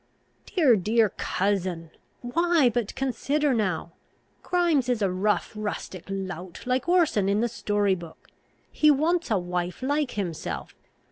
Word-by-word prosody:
"Dear, 300 - +4
dear 215 +3 +2
cousin! 185 -5 -2 0.3
why, 330 +2 +3
but 230 -3 -2
consider 275 +2 0
now. 185 -7 -1 0.5
Grimes 335 -8 +1
is 235 -4 +1
a 190 - +2
rough 205 +5 0
rustic 205 -4 -5
lout, 190 -2 -6
like 255 +6 0
Orson 315 - +3
in 205 +2 +2
the 240 - +2
story 205 -3 0
book. 170 -3 -9 0.4
He 305 - +4
wants 325 +5 +2
a 215 - +2
wife 180 +3 -3
like 290 +1 +1
himself. 160 - -4
215 Hz, 135 wpm, -26 LUFS, 185-275 Hz, 0.5 s, Dear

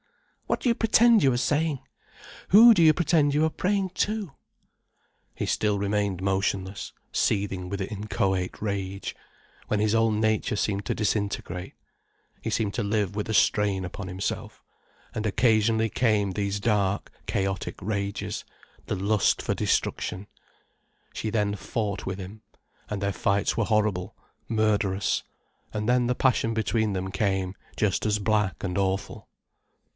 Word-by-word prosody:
What - - 0
do - - -1
you 235 - +5
pretend 225 0 +5
you 135 - +5
are 120 - 0
saying? 145 +2 +1 0.7
Who 230 +5 +9
do 185 - +2
you 160 - +8
pretend 155 -4 +2
you 155 +2 +4
are 160 - 0
praying 195 +1 0
to?" 210 -6 -1 1.0
He - - -2
still 105 -1 +1
remained 100 -2 -1
motionless, 95 0 -1 0.2
seething 95 -3 0
with 100 +1 -3
inchoate 95 -2 -2
rage, 100 -2 -3 0.5
when 105 - 0
his 105 0 +2
whole 115 0 +3
nature 110 0 +1
seemed 100 -1 -1
to - - -1
disintegrate. 100 -3 -2 0.7
He - - -3
seemed 105 -3 0
to 115 - -1
live 100 -1 0
with 105 +1 -3
a - - 0
strain 100 -3 +2
upon 95 +2 -6
himself, 95 +1 -4 0.5
and 110 - -3
occasionally 110 0 +3
came 105 -3 +1
these 100 +1 -2
dark, 100 -2 0 0.2
chaotic 95 0 -2
rages, 100 0 -3 0.4
the - - -1
lust 100 +1 +2
for - - -1
destruction. 95 +3 -1 0.9
She 110 - -3
then 105 -2 0
fought 105 +1 -3
with 95 0 -3
him, 100 +3 -9 0.5
and 105 -2 -3
their 100 0 0
fights 100 +2 +1
were 115 - +1
horrible, 105 -3 0 0.3
murderous. 105 -3 +1 0.5
And 105 0 -3
then 125 0 +3
the 125 - +1
passion 115 -3 +2
between 110 0 +1
them 95 0 -3
came 95 -1 -1 0.2
just 105 -2 +1
as 105 -1 +1
black 105 -1 0
and 90 -1 -2
awful. 95 +1 -2
105 Hz, 145 wpm, -26 LUFS, 100-115 Hz, 1.0 s, Who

